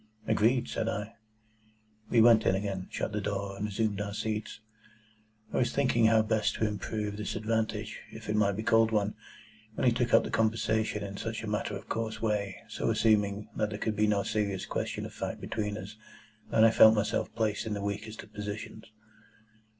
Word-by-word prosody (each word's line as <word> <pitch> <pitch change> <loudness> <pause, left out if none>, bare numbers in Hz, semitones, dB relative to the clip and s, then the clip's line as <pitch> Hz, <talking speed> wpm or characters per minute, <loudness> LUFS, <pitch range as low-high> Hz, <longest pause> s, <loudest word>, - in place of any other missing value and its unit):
"Agreed," 120 +4 +2
said 110 - -2
I. 105 0 -4 1.0
We 115 - +5
went 115 -1 +7
in 95 - +4
again, 95 -2 -3
shut - - -3
the 105 0 -2
door, 100 0 -3
and 105 +2 -3
resumed 105 -1 -1
our 100 0 -4
seats. 110 -1 -3 0.9
I - - 0
was 120 -2 +2
thinking 125 -5 +3
how 110 -1 +5
best 110 0 +1
to 110 - 0
improve 105 0 -3
this 105 - -4
advantage, 110 0 -2
if 110 0 -10
it 105 - 0
might 100 -1 +3
be 110 - -3
called 115 0 +4
one, 105 -1 +1 0.6
when - - -1
he 120 - +5
took 120 0 0
up - - +6
the - - -5
conversation 110 -1 +1
in 100 -1 -6
such - - -4
a - - -5
matter - - -2
of - - -13
course 110 -1 -3
way, 105 -3 -2
so - - -2
assuming 105 -2 +2
that 105 -1 0
there 105 - -5
could 110 0 -2
be 105 +1 +2
no 100 -1 +2
serious 100 -3 -1
question - - -3
of - - -9
fact - - -4
between 105 -1 -3
us, 105 +2 -8 0.5
that 110 - +4
I 115 - +6
felt 110 0 +8
myself 105 - 0
placed 110 -1 -1
in 105 - -2
the 100 - -4
weakest 105 +2 -4
of 105 - -18
positions. 105 +1 -6
105 Hz, 195 wpm, -30 LUFS, 105-110 Hz, 1.0 s, felt